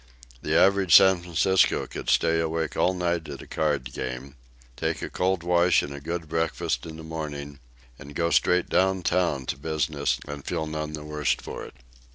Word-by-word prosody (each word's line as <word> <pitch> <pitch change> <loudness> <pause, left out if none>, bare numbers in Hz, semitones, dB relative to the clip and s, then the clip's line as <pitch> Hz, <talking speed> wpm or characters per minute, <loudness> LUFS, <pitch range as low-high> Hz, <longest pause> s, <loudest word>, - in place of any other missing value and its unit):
The - - +1
average 95 -3 +5
San 95 -2 +7
Franciscan 90 +2 +2
could - - -6
stay 80 0 +3
awake 80 0 -2
all 95 - +2
night 85 -3 -1
at 70 -2 -7
a - - -12
card 70 -5 -1
game, 65 +2 -6 0.4
take - - -2
a - - -5
cold 95 -1 0
wash 85 -2 +3
and 70 - -6
a 70 - -7
good 85 +2 -4
breakfast 80 +1 -1
in 80 -1 -8
the 80 - -9
morning, 75 -3 -6 0.4
and 70 +1 -11
go 85 +1 0
straight 90 0 +3
downtown 90 -6 +1
to 65 - -3
business 75 -1 -1
and 75 -1 -7
feel 80 - -2
none 75 0 -4
the 75 -1 -6
worse 75 -1 0
for - - -8
it. - - -13
80 Hz, 185 wpm, -26 LUFS, 75-85 Hz, 0.4 s, San